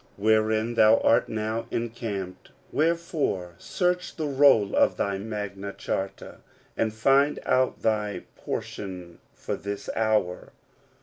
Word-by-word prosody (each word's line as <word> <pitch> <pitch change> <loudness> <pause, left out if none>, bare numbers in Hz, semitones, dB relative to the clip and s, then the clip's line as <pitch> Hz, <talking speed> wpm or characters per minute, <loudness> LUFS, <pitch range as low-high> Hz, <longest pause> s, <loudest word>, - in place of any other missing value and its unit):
wherein 110 +2 +2
thou 110 -1 +6
art 115 - +3
now 110 +1 -3
encamped: 110 -5 -4 0.2
wherefore 155 - 0
search 180 0 -1
the 155 - -3
roll 135 -8 +4
of - - +3
thy 100 -1 -1
Magna 100 -1 -5
Charta, 95 0 -4 0.4
and 110 - 0
find 135 +6 +3
out 130 0 +1
thy 105 -2 0
pon - - -3
tion 90 -4 -8 0.2
for - - -4
this 100 0 -5
hour. 110 -5 0
110 Hz, 120 wpm, -26 LUFS, 100-120 Hz, 0.4 s, thou